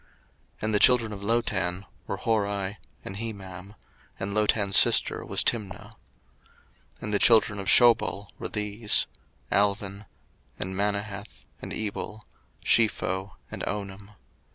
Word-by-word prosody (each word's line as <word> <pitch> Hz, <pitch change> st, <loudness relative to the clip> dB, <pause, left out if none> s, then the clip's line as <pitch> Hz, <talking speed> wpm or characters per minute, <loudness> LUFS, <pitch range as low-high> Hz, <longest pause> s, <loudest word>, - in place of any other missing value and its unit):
01:036:022 -, -, -16 dB
And 110 Hz, 0 st, 0 dB
the 105 Hz, -, +4 dB
children 115 Hz, -3 st, +5 dB
of 100 Hz, -, -8 dB
Lotan 100 Hz, -4 st, -1 dB, 0.2 s
were 100 Hz, -, -3 dB
Hori 100 Hz, -2 st, -1 dB, 0.3 s
and 95 Hz, -, -6 dB
Hemam; 100 Hz, -3 st, -8 dB, 0.4 s
and 100 Hz, +1 st, -3 dB
Lotan's 105 Hz, -2 st, +2 dB
sister -, -, +5 dB
was -, -, +1 dB
Timna. 105 Hz, -1 st, -2 dB, 1.1 s
01:036:023 -, -, -12 dB
And 105 Hz, -, -3 dB
the 100 Hz, -, +3 dB
children 110 Hz, -3 st, +4 dB
of 100 Hz, -, -6 dB
Shobal 115 Hz, -4 st, +4 dB
were -, -, -4 dB
these; 105 Hz, +1 st, 0 dB, 0.5 s
Alvan, 100 Hz, 0 st, 0 dB, 0.5 s
and 95 Hz, -, -4 dB
Manahath, 100 Hz, 0 st, -3 dB, 0.2 s
and -, -, -7 dB
Ebal, 110 Hz, 0 st, -5 dB, 0.4 s
Shepho, 95 Hz, -4 st, +1 dB, 0.2 s
and -, -, -6 dB
Onam. 100 Hz, 0 st, -6 dB
100 Hz, 130 wpm, -26 LUFS, 100-110 Hz, 1.1 s, children